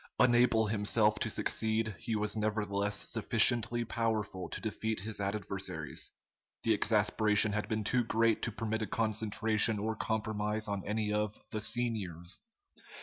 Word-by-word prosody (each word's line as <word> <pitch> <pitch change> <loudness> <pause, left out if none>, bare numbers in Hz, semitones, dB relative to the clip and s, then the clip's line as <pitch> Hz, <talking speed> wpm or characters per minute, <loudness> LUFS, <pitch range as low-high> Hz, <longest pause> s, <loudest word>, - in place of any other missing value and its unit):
Unable 120 -2 +4
himself 105 0 +2
to - - -1
succeed, 110 -1 -1
he 115 -1 -3
was 105 0 -1
nevertheless 105 -1 -1
sufficiently 120 +2 +3
powerful 110 -5 -2
to - - -5
defeat 110 -1 -3
his 105 0 -3
adversaries. 100 -7 -3 0.5
The 115 - +3
exasperation 105 0 +2
had 105 0 -2
been 110 -1 -2
too 125 +4 +1
great 115 0 +1
to 115 - -2
permit 110 +1 -3
a 110 - -2
concentration 110 0 +2
or 110 +2 -2
compromise 110 -1 -2
on 100 -2 -3
any 105 0 -1
of 105 0 -1
the 110 - -2
"seniors." 105 -7 -1
110 Hz, 140 wpm, -32 LUFS, 105-110 Hz, 0.5 s, Unable